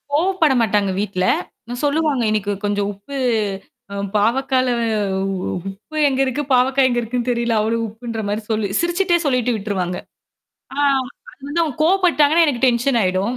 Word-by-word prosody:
கோவப்பட 330 -3 +2
மாட்டாங்க 205 -3 +1
வீட்ல. 195 -2 -1 0.5
அ - - -2
சொல்லுவாங்க. 290 -2 +1
இன்னைக்கு 210 -1 0
கொஞ்சம் 205 0 0
உப்பு 205 +8 -10 0.8
அ - - -5 0.2
பாவக்கல 255 +4 +2 1.0
உப்பு 215 +11 -10
எங்க 265 - -2
இருக்கு? 260 +2 -1
பாவக்கா 260 +2 +3
எங்க 240 -1 +1
இருக்குன்னு? 240 +1 -2
தெரியல! 235 -1 0
அவளோ 225 +2 0
உப்புன்ற 225 +1 -6
மாரி 210 +2 -2
சொல்லி 215 -2 0
சிரிச்சுட்டே 345 +1 +2
சொல்லிட்டு 250 -3 +1
விட்டுருவாங்க. 190 -4 -2 0.8
ஆ - - -6 0.5
அது 255 - -22
வந்து 335 +4 +1
அவுங்க 300 -5 -3
கோவப்பட்டாங்கன்னா, 340 -3 +4
எனக்கு 265 -4 0
டென்ஷன் 240 +1 +2
ஆயிடும். 190 +6 0
245 Hz, 145 wpm, -20 LUFS, 210-285 Hz, 1.0 s, கோவப்பட்டாங்கன்னா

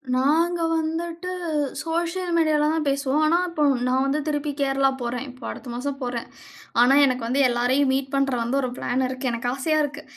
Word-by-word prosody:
நாங்க 330 +6 +2
வந்துட்டு 335 +3 -3 0.5
சோசியல் 340 +2 -2
மீடியால 305 -2 +3
தான் 320 -2 -1
பேசுவோம். 280 +2 +1
ஆனா, 330 +3 +4
இப்போ 310 -3 -1 0.2
நான் 260 +1 +2
வந்து 280 +2 0
திருப்பி 295 -1 -1
கேரளா 270 0 +2
போறேன். 245 +2 -3
இப்போ 255 - -16
அடுத்த 260 - -8
மாசம் 275 +3 -4
போறேன். 245 -2 -3 0.6
ஆனா, 260 +3 +5
எனக்கு 255 -3 -1
வந்து 270 +4 +1
எல்லாரையும் 255 +3 +2
மீட் 270 0 -2
பண்ணுற 275 -3 +1
வந்து 260 +4 0
ஒரு 255 - -2
பிளான் 255 +1 0
இருக்கு, 255 0 -3
எனக்கு 235 +1 -2
ஆசையா 310 +3 0
இருக்கு, 290 +1 -5
275 Hz, 175 wpm, -24 LUFS, 255-315 Hz, 0.6 s, ஆனா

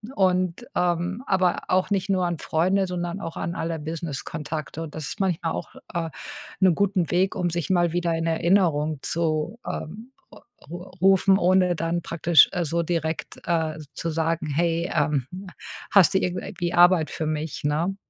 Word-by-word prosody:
Und, 185 +3 +1
ähm, 180 +5 0
aber 185 -2 +2
auch 185 +2 +2
nicht 195 -1 0
nur 185 -2 +2
an 175 -1 -1
Freunde, 185 +4 +1
sondern 175 +1 -4
auch 165 - -6
an 170 - -3
alle 165 -1 -3
Business-Kontakte. 155 0 -5
Und 155 - -8
das 155 -3 -5
ist - - -7
manchmal 175 -4 0
auch, - - -6 0.2
äh, 165 -1 -2 0.5
'ne 185 -2 +6
guten 185 -3 +1
Weg, 185 +2 +2
um 175 -1 0
sich 170 -3 -3
mal 175 -2 +2
wieder 175 -1 0
in 165 0 -2
Erinnerung 160 -4 +2
zu, 160 +4 -1
ähm, 220 +10 -6 0.2
r - - -15 0.3
ru 175 +2 -7 0.2
rufen, 190 0 +5
ohne 180 -1 +3
dann 165 +1 -1
praktisch, 170 -2 +5
äh, 175 -2 -1
so 170 +2 0
direkt, 165 -1 -3
äh, 160 -2 0
z 150 -2 -12
zu 165 - -3
sagen: 160 0 -1
„Hey, 170 +3 0
ähm, 145 -5 +1
hm, 190 +2 -8 0.4
hast 195 -1 +6
du - - +5
irgend 180 -1 -2
äh, - - -7
wie 175 0 -1
Arbeit 175 -3 +5
für 160 - -3
mich,“ 155 -1 -3
ne? 160 +6 0
170 Hz, 180 wpm, -24 LUFS, 160-185 Hz, 0.5 s, ne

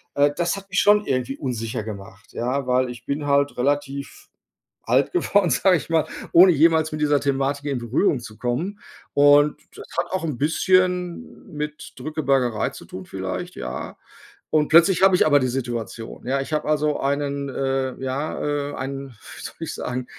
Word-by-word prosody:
äh, 145 0 +4
das 175 +2 0
hat 195 0 -11
mich 200 - +1
schon 210 0 +4
irgendwie 130 0 -1
unsicher 115 -5 -3
gemacht, 100 -2 -10
ja, 130 +2 -2
weil 125 0 +2
ich 120 0 -9
bin 145 +1 -3
halt 140 -1 +2
relativ 140 +1 -2 0.6
alt - - +2
geworden, 205 - +2
sage 180 +7 +4
ich 155 - -8
mal, 160 -2 +2 0.3
ohne 180 +2 +8
jemals 160 +1 +3
mit 155 - -4
dieser 145 -1 +3
Thematik 140 +1 -1
in 135 -3 -1
Berührung 125 - +1
zu 110 -2 -11
kommen. 165 +12 -2 0.3
Und 145 +1 +5 0.2
das - - -10
hat - - -1
auch 185 -3 -2
'n 145 -6 -3
bisschen 180 - 0
mit 150 0 -6
Drückebergerei 135 -7 0
zu - - -11
tun 95 -1 -9
vielleicht, 95 -1 -5
ja. 60 0 -6 0.5
Und 150 -1 +3
plötzlich 170 +4 +5
habe 190 -1 +6
ich - - +4
aber 145 -1 +5
die 130 - 0
Situation, 120 -2 -5
ja. 135 +1 +1
Ich 145 - -6
habe 150 0 -1
also 150 -1 +1
einen 140 0 -1
äh, 135 -1 -2
ja, 145 +1 -2
äh, - - -7
einen, 135 +1 -5
wie 110 - -13
soll - - -7
ich - - -4
sagen, 125 0 -4
140 Hz, 180 wpm, -23 LUFS, 130-155 Hz, 0.6 s, ohne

